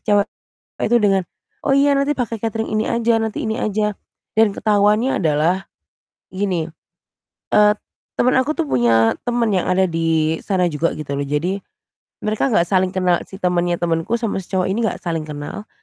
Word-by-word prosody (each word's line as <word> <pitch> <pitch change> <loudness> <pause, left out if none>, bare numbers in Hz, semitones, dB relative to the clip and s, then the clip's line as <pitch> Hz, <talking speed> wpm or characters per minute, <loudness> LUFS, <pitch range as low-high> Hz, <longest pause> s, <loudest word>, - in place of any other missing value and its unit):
cewek 205 -2 +2 0.6
itu 240 - +3
dengan, 195 -3 +2 0.4
"Oh - - +1
iya 280 +1 +4
nanti 280 +1 +1
pakai 235 -6 -3
catering 225 0 -2
ini 215 - 0
aja, 230 -1 +2
nanti 220 - -3
ini 220 - -1
aja," 210 -2 -1 0.4
dan 220 -1 +4
ketahuannya 210 +4 +2
adalah, 160 +5 +2 0.7
gini, 185 -4 -1 0.8
eee, 210 0 +5 0.4
temen 250 +1 +2
aku 280 +4 +1
tuh - - 0
punya 115 -3 +3
temen 240 -2 +1
yang 190 -3 +1
ada 185 0 +2
di 165 -1 +1
sana 185 -3 +1
juga 155 +2 0
gitu 140 -2 -5
loh. 140 - -1
Jadi 165 +7 -1 0.7
mereka 215 +5 +1
enggak 175 -7 +3
saling 185 +1 +2
kenal 180 -2 +2
si - - -10
temennya 175 -2 +1
temenku 170 +6 0
sama 225 -4 -2
si 185 - -10
cowok 185 -1 +2
ini 205 - -1
enggak 220 -4 0
saling 165 -2 -1
kenal, 150 +8 -7
195 Hz, 170 wpm, -20 LUFS, 170-225 Hz, 0.8 s, eee